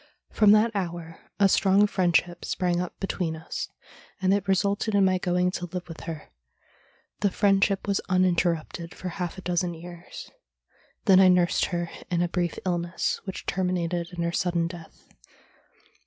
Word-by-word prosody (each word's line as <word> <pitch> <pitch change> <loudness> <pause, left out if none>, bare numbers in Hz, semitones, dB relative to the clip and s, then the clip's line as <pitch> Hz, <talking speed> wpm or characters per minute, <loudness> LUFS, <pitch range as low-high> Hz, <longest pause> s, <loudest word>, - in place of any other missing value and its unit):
From 210 -2 +4
that 215 +1 +3
hour 170 -3 -4 0.2
a 200 - +6
strong 195 +1 +4
friendship 175 -3 +1
sprang 175 -1 0
up 180 - -6
between 180 -4 -2
us, 160 +1 -5 0.5
and 190 0 +2
it 200 -1 0
resulted 200 +2 +1
in 200 -1 +5
my 185 -1 +2
going 180 0 +1
to 175 -1 -4
live 180 +1 -6
with 165 -2 -9
her. 160 -3 -7 0.9
The 200 - +2
friendship 195 0 +2
was 200 -1 +1
uninter 180 -1 +3
rupted 165 +2 -9
for 185 - -5
half 175 0 -4
a - - -7
dozen 175 -1 -1
years. 175 +1 -10 0.7
Then 190 -4 +7
I 190 - +7
nursed 180 -1 +3
her 175 -1 -3 0.2
in 175 -1 +1
a - - +1
brief 175 -1 -2
illness, 175 -1 -1
which 190 - -6
terminated 175 -2 -1
in 175 -1 -3
her 170 - 0
sudden 170 -1 0
death. 170 -1 -10
180 Hz, 165 wpm, -26 LUFS, 170-190 Hz, 0.9 s, Then